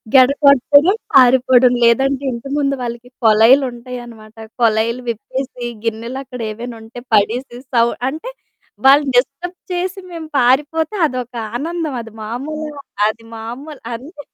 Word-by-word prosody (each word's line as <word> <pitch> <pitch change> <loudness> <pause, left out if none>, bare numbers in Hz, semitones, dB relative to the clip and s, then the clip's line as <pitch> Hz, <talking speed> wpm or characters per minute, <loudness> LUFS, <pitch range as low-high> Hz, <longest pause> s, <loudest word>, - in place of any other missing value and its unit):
గెడ 255 -1 +8 0.2
కొట్టడం 285 - +5 0.2
పారిపోవడం. 250 -1 +6
లేదంటే 270 +4 +3
ఇంటి 235 +2 -6
ముందు 275 -1 +1
వాళ్ళకి 240 0 -6 0.2
కొలైలు 225 +6 +6
ఉంటాయనమాట. 240 -3 -10 0.3
కొలైలు 230 +2 +2
విప్పేసి 250 +2 -5 0.2
గిన్నెలక్కడ 240 +3 -5
ఏవైనా 235 +2 -7
ఉంటే 230 +2 -10
పడేసి, 240 +4 0 0.2
సౌ 230 0 +5 0.2
అంటే 320 - -7 0.5
వాళ్ళని 280 +1 +6
డిస్టర్బ్ 310 +8 0
చేసి 365 +2 -2
మేము 330 -2 -7
పారిపోతే 295 - +2
అదొక 250 -4 -4 0.2
ఆనందమది 285 -5 -4
మామూల 300 +7 -5 0.3
అది 220 +1 -4
మామూల్ 260 +7 -8
అంటే 290 +6 -9
255 Hz, 115 wpm, -18 LUFS, 235-285 Hz, 0.5 s, గెడ